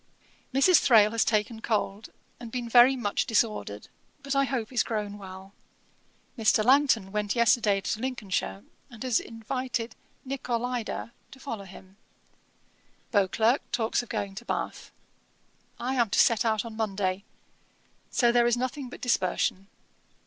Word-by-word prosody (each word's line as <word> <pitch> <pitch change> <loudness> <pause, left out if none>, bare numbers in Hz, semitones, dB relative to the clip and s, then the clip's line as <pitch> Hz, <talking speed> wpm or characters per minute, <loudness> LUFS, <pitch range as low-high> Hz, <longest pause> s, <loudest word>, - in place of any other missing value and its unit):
'Mrs. 275 +7 +5
Thrale 215 -5 +5
has 230 0 +2
taken 220 +1 0
cold, 215 -2 -2 0.3
and 235 -2 -9
been 245 -1 -4
very 245 +3 +6
much 210 -6 -1
disordered, 205 - -1 0.4
but 275 0 -2
I 275 0 +3
hope 255 -3 -3
is 245 - +3
grown 210 -2 -3
well. 190 0 -11 0.8
Mr. 220 -2 +2
Langton 255 -7 +3
went 210 +1 -1
yesterday 220 -4 +3
to 210 - -3
Lincolnshire, 195 - -3 0.3
and 235 -2 -9
has 250 -3 +2
invited 235 +1 -4 0.3
Nicolaida 245 -3 -3 0.2
to 265 - -14
follow 230 -7 -6
him. 190 +1 -14 1.1
Beauclerk 220 +5 +2
talks 225 0 0
of 245 - -13
going 200 -1 -3
to 195 - -8
Bath. - - -4 0.9
I 255 +2 -2
am 240 -4 +2
to - - -1
set 230 -1 +4
out 220 -1 +1
on 225 -1 -8
Monday; 195 -3 -2 0.9
so 240 -2 +3
there 240 0 +4
is 240 0 +2
nothing 255 +1 -3
but - - -11
dispersion. 195 -4 0
225 Hz, 140 wpm, -27 LUFS, 205-245 Hz, 1.1 s, very